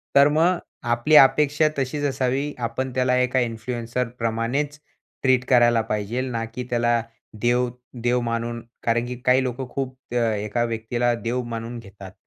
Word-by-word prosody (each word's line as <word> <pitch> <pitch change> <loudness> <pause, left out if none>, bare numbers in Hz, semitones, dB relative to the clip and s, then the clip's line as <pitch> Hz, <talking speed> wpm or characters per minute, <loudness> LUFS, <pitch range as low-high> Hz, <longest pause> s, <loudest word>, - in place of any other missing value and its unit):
तर 140 0 +8
मग 175 +2 +3 0.3
आपली 120 +6 +3
अपेक्षा 150 +2 +6
तशीच 140 +2 -2
असावी. 135 +1 0
आपण 130 +3 -3
त्याला 125 0 +2
एका 125 +1 +2
इन्फ्लुएन्सर 120 +1 -2
प्रमाणेच 120 +6 -1 0.4
ट्रीट 130 -1 +3
करायला 120 -2 +5
पाहिजेल, 110 +3 -2
ना 115 -1 -2
की 115 +3 -6
त्याला 120 -1 +2 0.4
देव 120 +1 +2 0.3
देव 125 +1 +2
मानून. 115 0 -2 0.2
कारण, 115 +1 +1
की 125 +1 -5
काही 130 +1 +4
लोकं 130 +1 -3
खूप 130 0 -4 0.2
त्या 115 -2 +1
एका 105 +3 -1
व्यक्तीला 120 +1 0
देव 120 +2 -1
मानून 115 +1 -5
घेतात 100 -3 -12
120 Hz, 150 wpm, -23 LUFS, 115-130 Hz, 0.4 s, तर